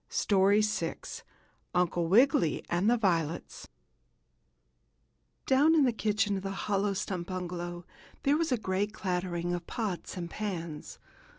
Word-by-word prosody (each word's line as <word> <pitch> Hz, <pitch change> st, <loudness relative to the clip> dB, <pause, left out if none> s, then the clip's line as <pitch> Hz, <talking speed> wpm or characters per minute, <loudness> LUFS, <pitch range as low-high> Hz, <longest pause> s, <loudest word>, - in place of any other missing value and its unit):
STORY 200 Hz, +1 st, +3 dB
VI 210 Hz, -6 st, -1 dB, 0.8 s
UNCLE 175 Hz, -1 st, +1 dB
WIGGILY 205 Hz, -, +4 dB
AND 175 Hz, +5 st, +2 dB
THE 240 Hz, -, +4 dB
VIOLETS 170 Hz, -7 st, -1 dB, 1.8 s
Down 290 Hz, +5 st, +4 dB
in 305 Hz, -, +5 dB
the 250 Hz, -3 st, +3 dB
kitchen 210 Hz, -2 st, 0 dB
of -, -, -4 dB
the 195 Hz, -, -4 dB, 0.2 s
hollow 200 Hz, -1 st, +1 dB
stump 185 Hz, -2 st, -3 dB
bungalow 175 Hz, -1 st, -5 dB, 0.4 s
there 280 Hz, +1 st, +3 dB
was 320 Hz, -1 st, 0 dB
a 250 Hz, -, +3 dB
great 205 Hz, +1 st, -2 dB
clattering 180 Hz, -3 st, -2 dB
of 175 Hz, -1 st, -4 dB
pots 205 Hz, -6 st, -4 dB
and 175 Hz, -1 st, -4 dB
pans. 170 Hz, -6 st, -5 dB
190 Hz, 130 wpm, -30 LUFS, 175-215 Hz, 1.8 s, in